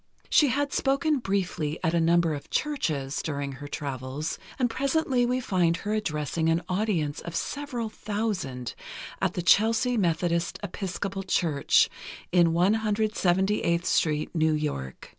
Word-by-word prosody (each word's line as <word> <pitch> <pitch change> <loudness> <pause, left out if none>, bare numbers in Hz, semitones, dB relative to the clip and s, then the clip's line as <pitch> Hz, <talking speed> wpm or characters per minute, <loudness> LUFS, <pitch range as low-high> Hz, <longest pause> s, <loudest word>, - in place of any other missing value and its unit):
She 295 - +6
had 285 +3 0
spoken 280 +2 +1
briefly 185 -8 -1
at 160 - +1
a 170 - +3
number 170 -1 +3
of 145 - -7
churches, 155 - -1
during 140 -2 -3
her 140 +2 -8
travels, 140 +1 -4 0.2
and 255 - +2
presently 265 0 +1
we 250 +1 +1
find 175 -8 +1
her 210 +3 -3
addressing 160 -5 -1
an 165 +1 +1
audience 180 -7 -1
of 170 -1 -7
several 270 -4 -3
thousand, 205 - -3 0.5
at - - 0
the 180 - -2
Chelsea 225 +6 +4
Methodist 170 -2 0
Episcopal 195 0 -4
Church, 165 -6 +3 0.4
in 175 -1 +5
178th 195 -1 +1
Street, 150 -1 +1
New 160 -2 +2
York. 145 - -4
180 Hz, 135 wpm, -27 LUFS, 155-220 Hz, 0.5 s, She